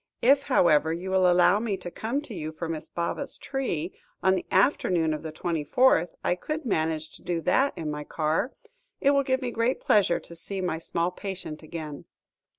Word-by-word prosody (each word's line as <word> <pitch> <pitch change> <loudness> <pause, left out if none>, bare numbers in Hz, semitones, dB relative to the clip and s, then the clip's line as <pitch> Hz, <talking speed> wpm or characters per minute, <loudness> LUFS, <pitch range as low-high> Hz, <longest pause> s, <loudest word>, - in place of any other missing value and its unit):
If, 275 +3 +6
however, 160 - +3
you 180 +3 -4
will 185 -1 +4
allow 180 +3 +5
me 215 -3 -1
to 180 -1 -7
come 235 +10 -2
to 250 - -9
you 155 -4 -4
for 165 +1 -5
Miss 160 -1 -5
Baba's 170 +11 -2
tree, 190 - -3 0.3
on 190 - +5
the 185 - -2
afternoon 180 - +2
of 150 - -4
the 160 - -6
twenty 160 0 -2
fourth, 180 - +4
I - - +2
could 305 - -4
manage 160 -6 -1
to - - -13
do 175 -2 -2
that 275 - +2
in 155 -2 -3
my 150 0 -4
car. 155 - -1 0.5
It 280 - +4
will 280 -1 +4
give 260 -1 0
me 245 - -2
great 230 +3 0
pleasure 195 -5 +3
to 170 - -12
see 190 +4 -4
my 175 -3 -1
small 170 +1 -1
patient 185 -5 -6
again." 155 -2 -7
180 Hz, 200 wpm, -27 LUFS, 160-230 Hz, 0.5 s, If